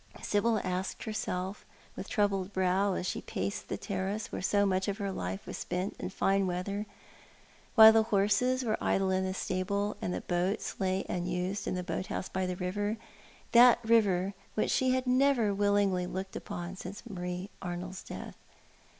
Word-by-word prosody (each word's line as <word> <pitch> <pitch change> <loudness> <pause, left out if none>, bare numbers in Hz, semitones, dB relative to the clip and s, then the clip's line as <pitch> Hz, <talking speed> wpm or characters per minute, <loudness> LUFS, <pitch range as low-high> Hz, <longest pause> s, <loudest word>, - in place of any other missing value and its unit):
Sibyl 215 +1 +1
asked 185 +1 -3
herself 205 -3 -3 0.3
with - - -7
troubled 200 -3 +1
brow, 190 +1 +2
as - - -2
she - - -2
paced 200 - -4
the - - -3
terrace, 200 +1 -3
where - - -4
so 205 +2 +3
much 190 -1 +1
of 200 0 -1
her 200 -2 -2
life 95 - -4
was - - -6
spent 180 +3 -3
in - - -3
fine 195 0 +1
weather, 200 +4 -3 0.9
while 220 -2 +11
the 225 - +6
horses 220 +5 +2
were 220 -3 -1
idle 190 -1 +2
in 190 0 +1
the 190 0 -2
stable, 200 +3 -1
and - - -2
the - - -2
boats 180 +4 -1
lay 190 -1 0
unused 180 +3 -2
in - - -1
the 180 - -2
boat 185 - -3
house - - -4
by 190 -1 -1
the 180 - -2
river 205 +4 -2 0.3
— - - -23
that 240 0 +8
river 200 -4 +3 0.2
which 215 - +1
she 260 - +2
had 255 0 +1
never 250 -4 +3
willingly 200 -2 +2
looked 190 +1 -5
upon 175 +2 -5
since 190 +3 -8
Marie 180 -1 -5
Arnold's 180 +1 -5
death. - - -8
195 Hz, 175 wpm, -31 LUFS, 185-210 Hz, 0.9 s, while